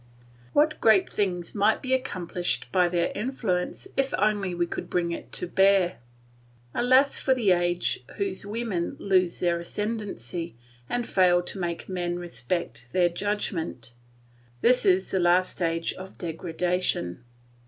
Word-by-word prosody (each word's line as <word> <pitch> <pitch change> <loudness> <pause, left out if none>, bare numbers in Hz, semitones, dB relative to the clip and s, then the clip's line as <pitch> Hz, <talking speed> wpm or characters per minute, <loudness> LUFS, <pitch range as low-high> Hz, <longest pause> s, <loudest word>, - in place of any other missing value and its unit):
What 305 +1 +3
great 215 -4 +5
things 180 -4 -2
might 210 +1 +3
be 260 0 0
accomplished 180 -8 -2
by 180 -2 +3
their 175 -1 0
influence 210 - -2
if 270 0 +1
only 200 -3 +1
we 175 0 +1
could - - -6
bring 170 -1 0
it 170 - -6
to - - -3
bear! 190 0 +3 0.7
Alas 260 +3 +4
for 265 - +2
the 220 -7 +2
age 175 0 +1 0.2
whose 195 -1 -2
women 205 -4 -3
lose 185 -3 +2
their 175 -1 +2
ascendancy, 175 - -4 0.3
and 245 -1 -1
fail 180 -3 +3
to 190 - -4
make 170 -2 -3
men 175 -2 -2
respect 125 -5 -3
their 180 -2 +4
judgment! 170 - -3 0.7
This 250 -3 +4
is 185 0 +3
the 190 - +1
last 180 +1 +3
stage 165 -1 -1
of 190 +1 -10
degradation. 170 - -2
180 Hz, 140 wpm, -26 LUFS, 175-205 Hz, 0.7 s, great